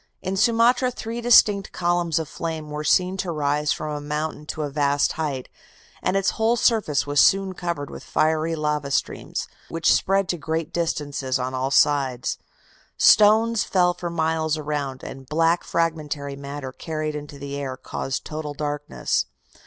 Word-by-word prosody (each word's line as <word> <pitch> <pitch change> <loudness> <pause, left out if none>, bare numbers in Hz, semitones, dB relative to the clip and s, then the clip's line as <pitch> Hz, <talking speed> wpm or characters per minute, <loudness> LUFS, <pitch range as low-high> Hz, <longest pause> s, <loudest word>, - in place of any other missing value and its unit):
In 190 +1 -2
Sumatra 235 +4 +3
three 235 -1 -5
distinct 210 -4 +5
columns 175 -2 0
of 160 -2 -1
flame 160 -1 -5
were 150 +1 -4
seen 185 +4 +2
to 185 -2 -2
rise 150 -1 0
from 150 -1 -3
a 145 - -5
mountain 150 +1 -4
to 155 - -3
a 145 - -2
vast 145 0 +2
height, 145 -5 -3 0.5
and 195 - +1
its 195 0 +2
whole 225 +2 +1
surface 220 - +2
was 145 0 +3
soon 195 -1 +3
covered 170 -6 -4
with - - -9
fiery 160 +1 +1
lava 150 -2 -1
streams, 140 - -2 0.2
which 165 0 +3
spread 195 0 +2
to 175 - -1
great 160 0 -3
distances 145 -6 -1
on 130 0 -3
all 130 +1 -1
sides. 135 -3 +2 0.6
Stones 220 +1 +5
fell 180 -2 +2
for 175 0 -5
miles 160 -1 0
around, 145 -3 -3
and 135 -1 -9
black 165 +2 +2
fragmentary 150 -4 -2
matter 140 -1 -6
carried 155 +1 -4
into 145 -1 -7
the 140 0 -6
air 135 -2 -4
caused 130 +1 -4
total 150 -1 -5
darkness. 145 - -2
155 Hz, 160 wpm, -23 LUFS, 145-175 Hz, 0.6 s, distinct